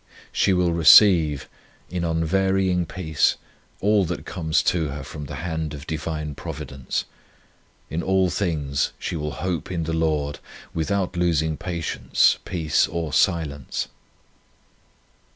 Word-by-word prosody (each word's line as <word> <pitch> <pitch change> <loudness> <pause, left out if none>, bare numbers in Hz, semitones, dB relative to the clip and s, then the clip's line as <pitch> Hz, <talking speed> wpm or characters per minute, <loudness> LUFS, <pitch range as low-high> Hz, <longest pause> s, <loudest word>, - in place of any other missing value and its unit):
1 - - -37 0.2
She 100 - +2
will 90 -2 +2
receive 80 -3 +6 0.4
in 90 -1 -2
unvarying 90 +2 +1
peace 80 -5 +1 0.5
all 105 0 +3
that 85 +1 -4
comes 80 -3 0
to 80 -3 +1
her 70 0 -6
from 75 +1 -7
the - - -7
hand 80 -3 -3
of 70 +1 -9
Divine 75 -1 -4
Providence. 70 -1 -5 0.8
In 80 +3 -3
all 95 0 +2
things 75 -8 -1
she - - -4
will 75 -1 -3
hope 90 -2 -3
in 85 -3 -1
the 80 +1 -3
Lord, 75 -3 0 0.3
without 90 +3 -1
losing 80 -3 +1
patience, 85 0 +1
peace, 80 -4 +1
or 85 -2 -4
silence. 75 -5 0
80 Hz, 130 wpm, -23 LUFS, 75-90 Hz, 0.8 s, receive